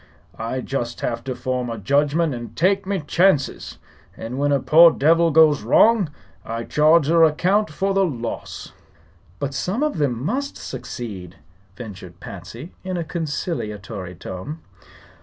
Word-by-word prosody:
I 115 +3 -3
just 120 -3 -4
have 115 -1 -2
to 130 -1 -3
form 125 -1 -2
a 115 - -4
judgment 145 - +1
an' 120 -2 -7
take 190 - +1
me 195 -3 -1
chances; 150 -1 +1 0.4
and 115 +2 -6
whin 145 0 +1
a 140 - +3
poor 165 +5 +7
devil 165 +2 +3
goes 155 -2 +5
wrong 200 - +4 0.3
I 115 +1 -4
charge 155 +3 +4
your 165 +1 +5
account 180 +6 +2
with 195 0 +1
the 195 0 +3
loss." 120 -10 -5 0.6
"But 140 -1 -3
some 185 - -1
of 300 - -1
them 130 -6 0
must 275 - -2
succeed," 100 -8 -7 0.4
ventured 95 -6 -10
Patsy, 105 - -9
in 185 -1 -3
a 170 - -2
conciliatory 110 - -4
tone. 95 - -7
145 Hz, 145 wpm, -22 LUFS, 115-170 Hz, 0.6 s, poor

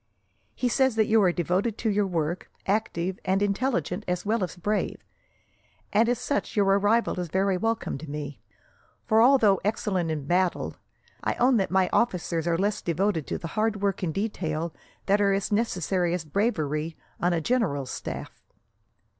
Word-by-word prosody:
He 250 - 0
says 260 0 +2
that 220 -1 +3
you 220 0 +4
are 185 -3 +4
devoted 185 +6 0
to 225 - -1
your 205 0 +1
work, 170 -1 -2 0.2
active 190 -3 -1
and 190 +1 +1
intelligent 215 +2 -1
as 180 +1 -2
well 215 0 +1
as 180 - -4
brave; 205 +4 -1 1.0
and 225 +3 +4
as 245 - +2
such 285 - -2
your 205 -2 +3
arrival 205 +2 +2
is 180 - -2
very 190 +3 +1
welcome 225 -6 -1
to 155 - -9
me, 145 -1 -6 0.6
for 220 +1 +4
although 230 -6 +5
excellent 195 -4 0
in 150 -3 -3
battle, 180 +3 0 0.5
I - - 0
own 250 0 +4
that 195 - 0
my 190 0 +3
officers 175 -7 0
are 170 -1 +2
less 205 +3 0
devoted 170 -2 0
to - - -2
the 165 - -6
hard 215 +1 0
work 200 -1 0
and 175 -4 -1
detail 165 -5 -2 0.3
that 200 +1 +3
are 200 -1 +3
as 195 +2 -1
necessary 185 -5 +1
as 170 -3 -5
bravery 155 -4 -1 0.2
on 175 - +2
a 170 - +1
general's 155 - 0
staff. - - -6
195 Hz, 170 wpm, -26 LUFS, 170-215 Hz, 1.0 s, although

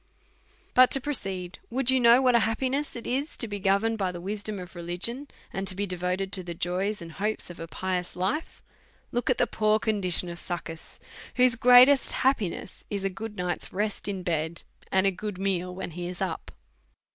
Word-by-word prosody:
But 255 0 +7
to 270 - +3
proceed; 195 -10 -4
would 260 +1 +2
you 260 - +4
know 240 +2 +6
what 250 -1 +5
an 235 - +5
happi 225 +4 0
ness 285 +2 -2
it 235 - -7
is 275 +5 -2
to 235 - -1
be 205 -1 -4
governed 200 +3 +2
by 190 -2 0
the 175 - -7
wisdom 205 +3 -3
of 180 0 -9
religion, 180 +11 -2 0.3
and 195 -1 -2
be 200 +2 -1
devoted 180 +1 -2
to 185 - -1
the 170 -1 -6
joys 185 +3 -1
and 165 - -9
hopes 210 +1 -2
of 175 - -12
a 165 - -6
pious 180 +1 -3
life, 190 - -2 0.5
look 240 +1 -1
at 255 - +3
the - - +4
poor 215 -1 +2
condition 200 -5 0
of 170 0 -6
Succus, 165 -2 -6 0.4
whose 250 -1 +6
greatest 250 +3 +7
happiness 220 -9 -1
is 200 -2 -3
a 195 - 0
good 210 +2 -7
night's 180 -1 -3
rest 210 +2 -2
in 195 -2 -3
bed, 165 -1 -2 0.3
and 190 0 +3
a 195 - +4
good 205 +1 -5
meal 185 -2 -1
when 185 -1 -5
he 175 +2 -5
is 180 0 -6
up. 185 -4 -3
195 Hz, 200 wpm, -27 LUFS, 180-235 Hz, 0.5 s, But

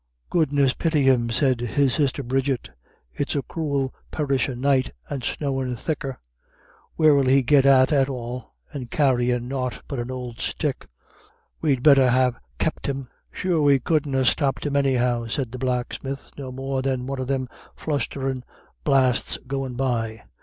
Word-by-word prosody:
"Goodness 145 -5 +3
pity 160 -4 +1
him," 125 -3 +3
said 130 +1 +2
his 130 +2 +1
sister 140 -1 0
Bridget. 130 - -1 0.4
"It's 145 - -2
a 140 - 0
cruel 140 -5 -2 0.2
perishin' 135 -4 -1
night, 135 -1 +2 0.2
and 135 -3 -4
snowin' 135 -1 -2
thicker. 135 -1 -3 0.8
Where'll 145 -4 +4
he 135 +1 +5
get 140 +1 +4
to 135 +1 +5
at 135 -1 +3
all? 125 -2 -6 0.2
And 130 -5 -6
carryin' 125 -4 +1
nought 125 -3 -3
but 140 -4 -4
an 120 +1 -4
old 125 -1 -6
stick. 145 -4 -2 0.7
We'd 135 -6 +1
better 140 -4 +7
ha' 125 0 +3 0.2
kep' 160 - -1
him." 135 -2 -3 0.2
"Sure 175 -4 0
we 140 -2 +5
couldn't 145 0 0
ha' 130 - +2
stopped 140 +1 +1
him 145 -1 -1
anyhow," 125 -4 +1
said 125 0 -2
the 130 - -6
blacksmith, 130 +2 -3
"no 135 -2 -7
more 135 +1 -3
than 130 -2 -1
one 135 0 -4
of 130 - -3
them 130 -1 -1 0.3
flustherin' 135 -3 -2 0.4
blasts 130 -3 +2
goin' 135 -1 -3
by. 115 -4 -1
135 Hz, 155 wpm, -24 LUFS, 125-140 Hz, 0.8 s, better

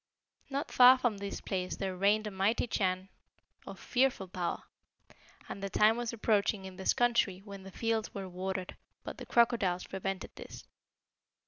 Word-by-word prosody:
"Not 280 +1 -3
far 255 +1 +8
from 240 -5 -1
this 200 0 -5
place 185 -1 -3
there 190 -1 -3
reigned 205 +3 +2
a 210 - -4
mighty 195 +5 +1
Chan 185 -4 -1 0.6
of - - -8
fearful 250 -6 +1
power; 180 -1 -3 0.8
and 200 - -7
the 195 - -3
time 215 +3 +4
was 240 -1 -3
approaching 210 -3 +1
in 190 -1 -9
this 190 - +2
country 235 -6 +1
when 200 -2 -9
the 190 0 -11
fields 225 +1 -1
were 195 -1 -6
watered, 185 0 -4 0.3
but - - -7
the - - -8
crocodiles 225 -7 +2
prevented 195 0 -4
this. - - -10
200 Hz, 160 wpm, -31 LUFS, 190-230 Hz, 0.8 s, far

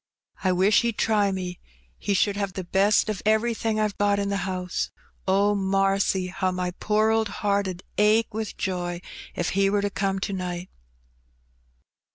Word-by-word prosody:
I 185 - +3
wish 190 +4 +4
he'd 235 -2 -1
try 205 -3 +2
me, 180 -2 -4 0.4
he 200 - 0
should 200 +1 +2
have 200 -2 -2
the 190 - -4
best 195 +5 +3
of 215 -3 -3
everything 220 0 +1
I've 215 -2 -1
got 205 0 +3
in 200 0 -1
the 200 - 0
house. 180 -1 -2 0.4
Oh, 200 +2 +3
marcy! 195 -1 +1
how 185 0 -1
my 180 0 -2
poor 215 +1 +2
old 220 0 +2 0.2
heart 200 -1 +2
'ud 185 -1 -6 0.2
ache 215 +1 +3
with 220 0 -4
joy 175 -2 -2 0.3
if 175 - -1
he 195 +1 +2
were 200 0 +1
to 205 - 0
come 195 0 -1
to 195 +1 -3
night.' 180 -1 -4
195 Hz, 175 wpm, -25 LUFS, 185-210 Hz, 0.4 s, wish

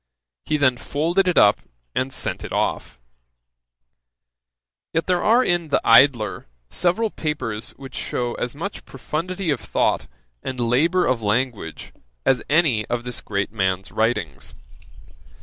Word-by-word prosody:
He 155 - +1
then 130 -4 +3
folded 170 +9 0
it 180 - +1
up 105 - +6 0.3
and 130 +1 -1
sent - - -3
it - - -7
off. - - -1 2.0
Yet 165 0 +1
there 180 -1 +1
are 235 +4 +5
in 175 -5 0
The 145 - +2
Idler 115 -3 +4 0.2
several 210 +5 +1
papers 130 -8 -3
which 135 -2 -10
shew 120 -1 -2
as 120 +2 -3
much 195 +7 -5
profundity 165 +6 -3
of 140 - 0
thought, - - 0 0.3
and 130 -1 -5
labour 145 +10 +2
of 130 -3 +1
language, 105 -5 -2 0.3
as 125 -3 +3
any 145 -8 +3
of 120 0 -2
this 125 -1 -4
great 100 0 -2
man's 95 -3 -1
writings. 110 - -2
130 Hz, 135 wpm, -22 LUFS, 115-165 Hz, 2.0 s, up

